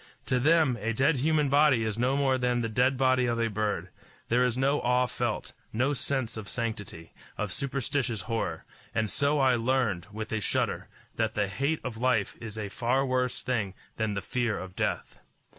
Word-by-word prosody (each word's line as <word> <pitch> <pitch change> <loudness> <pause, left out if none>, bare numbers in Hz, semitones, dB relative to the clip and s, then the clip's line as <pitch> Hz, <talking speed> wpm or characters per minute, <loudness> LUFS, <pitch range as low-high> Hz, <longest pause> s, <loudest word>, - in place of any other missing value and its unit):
To 130 - +2
them 150 -3 +3
a 115 +2 0
dead 135 +5 +3
human 150 +2 +2
body 140 -4 +4
is 110 0 -2
no 130 +3 +2
more 135 -2 +2
than 125 -1 +1
the 115 - -1
dead 125 +4 +2
body 130 -1 +3
of 115 -1 0
a 115 -1 +1
bird: 105 0 -1 0.4
there 125 +2 +4
is 125 -1 +1
no 140 +2 +2
awe 125 +1 +3
felt, 125 - -3 0.2
no 130 +6 +1
sense 130 -4 -1
of 105 -2 -6
sanctity, 105 -8 -5 0.2
of 105 -2 -2
superstitious 135 - -2
horror; 115 +4 -3 0.3
and 110 -2 +1
so 140 +1 +2
I 135 -2 +4
learned, 115 -7 0
with 110 +1 -6
a 110 - 0
shudder, - - -1 0.3
that 110 -1 0
the 105 -1 +1
hate 140 +10 -1
of 120 -3 -5
life 120 -4 +1
is 110 -1 -7
a 105 -2 -3
far 125 +6 +1
worse 125 -1 0
thing 110 -7 -1 0.2
than 110 -2 -1
the 100 - -2
fear 120 -1 -1
of 95 0 -8
death. - - -2
125 Hz, 195 wpm, -28 LUFS, 110-135 Hz, 0.4 s, body